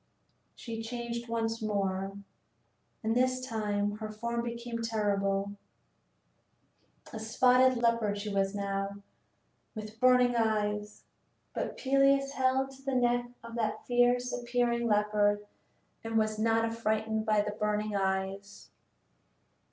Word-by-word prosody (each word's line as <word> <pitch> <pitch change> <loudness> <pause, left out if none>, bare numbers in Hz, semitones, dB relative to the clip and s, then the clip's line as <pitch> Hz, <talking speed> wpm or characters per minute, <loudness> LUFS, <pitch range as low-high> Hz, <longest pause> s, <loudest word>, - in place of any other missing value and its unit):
She 225 -2 -6
changed 235 0 -5
once 225 0 -1
more, 195 -2 -1 0.9
and 225 +1 +1
this 255 +1 +2
time 210 -4 -1
her 215 0 -5
form 235 +2 -3
became 235 0 -4
terrible: 200 -3 0 1.6
a 220 - -5
spotted 250 +3 +4
leopard 230 -3 +1
she 205 0 -4
was 195 0 +1
now, 200 0 -2 0.8
with 215 0 -8
burning 250 -1 +5
eyes; 210 -2 0 0.5
but - - -3
Peleus 275 0 +3
held 265 0 +1
to 270 0 -15
the 270 -1 -2
neck 245 -1 +2
of 230 0 -9
the 220 -2 0
fierce 245 0 +3
appearing 240 -1 0
leopard 210 -1 +2 0.6
and 225 0 -1
was 215 -1 +1
not 225 +1 +3
affrighted 220 -1 -1
by 215 -2 +3
the 210 0 -2
burning 210 0 -1
eyes. 195 +1 -2
225 Hz, 120 wpm, -30 LUFS, 210-240 Hz, 1.6 s, burning